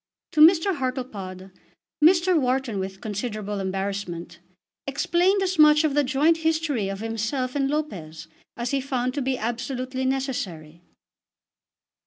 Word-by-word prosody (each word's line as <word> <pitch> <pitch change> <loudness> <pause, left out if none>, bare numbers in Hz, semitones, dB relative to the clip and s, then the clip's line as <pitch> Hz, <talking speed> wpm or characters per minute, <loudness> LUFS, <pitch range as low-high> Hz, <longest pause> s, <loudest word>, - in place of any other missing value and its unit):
To 305 - +2
Mr. 345 +2 +6
Hartlepod 210 -8 -5 0.5
Mr. 355 +2 +5
Wharton, 255 -6 0
with 190 0 -5
considerable 210 -1 -4
embarrassment, 190 -3 -4 0.5
explained 355 +8 +2
as 370 -3 -2
much 300 0 +7
of 305 -3 +1
the 290 0 +3
joint 295 +5 +2
history 315 -10 0
of 195 +1 -5
himself 225 +4 -2
and 275 -1 +1
Lopez 165 - -4 0.3
as 240 0 -2
he 275 -1 0
found 255 -2 -2
to 285 - -2
be 260 0 -1
absolutely 255 +3 -3
necessary. 190 - -3
255 Hz, 130 wpm, -24 LUFS, 200-300 Hz, 0.5 s, much